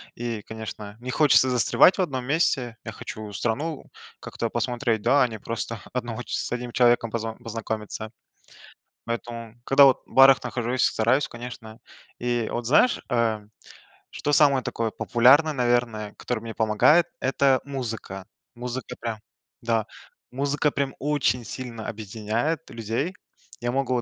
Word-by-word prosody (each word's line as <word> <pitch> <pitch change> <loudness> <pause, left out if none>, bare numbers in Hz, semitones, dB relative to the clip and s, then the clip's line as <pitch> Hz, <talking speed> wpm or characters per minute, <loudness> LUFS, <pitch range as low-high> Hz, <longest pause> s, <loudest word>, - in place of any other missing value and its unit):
и, 115 -2 -4
конечно, 105 -1 -8
не 125 +1 -5
хочется 135 -2 +5
застревать 125 - +4
в - - +1
одном 135 -8 -2
месте. 135 -5 0
Я 110 - -6
хочу 110 -1 -8
страну 140 +9 -3 0.3
как-то 115 - -4
посмотреть, 120 -1 -1
да, 130 +6 +4
а - - +3
не 110 -2 -8
просто 115 +1 -4
одного 120 -1 -3
ч 120 +4 -8
с - - -4
одним 125 0 -3
человеком 120 -2 +3
поз 115 0 -2 0.2
познакомиться. 110 -1 -5 0.9
Поэтому, 115 -1 -5
когда, 140 +1 +7
вот, 135 -2 +4
в - - -18
барах 135 +1 +7
нахожусь, 125 +1 -1
стараюсь, 125 +6 +2
конечно. 120 -2 -9 0.4
И 120 -2 -1
вот 120 0 -3
знаешь, 155 - +4
э, 115 -3 +1 0.7
что 145 - -2
самое 140 -3 +5
такое 115 -1 -2
популярное, 130 +10 +4
наверное, 120 -5 0
которое 125 - -3
мне 115 -1 -7
помогает- 110 +11 +4
это 135 0 +2
музыка. 115 -8 -5 0.3
Музыка, 125 0 -6
прям, 115 -2 -3 0.4
да, 115 -2 0 0.4
музыка, 145 +3 0
прям, 140 -1 -2
очень 135 -5 +1
сильно 115 0 -7
объединяет 110 +9 -3
людей. 115 - -3 0.5
Я 120 0 -2
могу, 130 -2 0
120 Hz, 140 wpm, -25 LUFS, 110-135 Hz, 0.9 s, когда